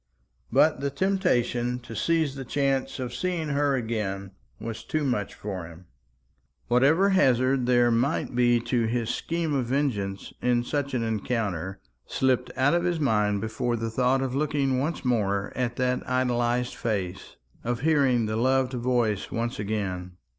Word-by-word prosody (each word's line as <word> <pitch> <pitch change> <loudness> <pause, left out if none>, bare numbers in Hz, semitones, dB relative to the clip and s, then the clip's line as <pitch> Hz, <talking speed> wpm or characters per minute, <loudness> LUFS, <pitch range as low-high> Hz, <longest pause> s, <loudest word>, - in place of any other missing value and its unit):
But 155 -3 +4
the 140 +1 -1
temptation 125 -8 +1
to 115 -1 -9
seize 160 -2 +1
the 135 -1 -6
chance 135 +1 0
of 125 -2 -4
seeing 175 -1 -2
her 140 -1 +2
again 105 -5 -3 0.3
was 115 -1 -6
too 155 -1 -1
much 125 -7 -1
for 95 -5 -5
him. 85 +2 -13 0.8
Whatever 145 +11 +4
hazard 130 -7 +3
there 120 -1 +4
might 125 +5 0
be 120 -1 +4
to 120 -1 0
his 115 0 -1
scheme 165 -2 -2
of 130 -4 0
vengeance 115 -8 -1
in 120 -1 +2
such 140 +1 -2
an 120 - 0
encounter 100 -5 -2 0.3
slipped 130 -1 +1
out 135 +3 +3
of 175 0 +2
his 175 -2 0
mind 105 -7 +1
before 110 +2 -1
the 115 0 -3
thought 130 +3 +2
of 130 -2 -2
looking 140 -2 +1
once 150 +1 -2
more 100 -5 0
at 120 -2 -1
that 125 0 0
idolised 125 -1 +1
face, 100 -6 -3 0.3
of 120 0 -2
hearing 140 -6 +3
the 110 0 -2
loved 130 +2 +2
voice 120 -4 0
once 115 0 -3
again. 95 -4 -3
125 Hz, 155 wpm, -26 LUFS, 110-135 Hz, 0.8 s, But